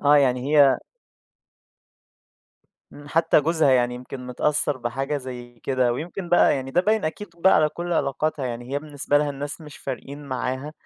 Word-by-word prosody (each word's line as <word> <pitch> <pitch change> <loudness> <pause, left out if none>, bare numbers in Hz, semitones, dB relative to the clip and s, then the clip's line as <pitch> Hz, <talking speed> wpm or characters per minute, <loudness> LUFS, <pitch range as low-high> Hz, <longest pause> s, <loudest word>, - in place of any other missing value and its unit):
آه، 145 +1 +5
يعني 135 +2 +2
هي 140 -2 +6 2.1
إمم، 145 0 -12
حتى 165 0 +3
جوزها 160 -1 +2
يعني 125 -1 +3
يمكن 125 +1 -8
متأثّر 145 +3 0
بحاجة 135 +4 -2
زي 125 -3 -8
كده، 130 -2 +1
ويمكن 175 +7 -5
بقى 175 - +5
يعني 135 -1 -4
ده 175 - +3
باين 215 -1 +1
أكيد 185 +6 -4
بقى 190 +3 +5
على 155 -1 +4
كل 175 +2 -5
علاقاتها، 145 -1 -1
يعني 120 +1 -6
هي 140 - +1
بالنسبة 145 -1 0
لها 145 -1 0
الناس 145 +3 -6
مش 150 -2 -11
فارقين 140 +2 -7
معاها، 130 +2 -3
140 Hz, 165 wpm, -24 LUFS, 130-155 Hz, 2.1 s, هي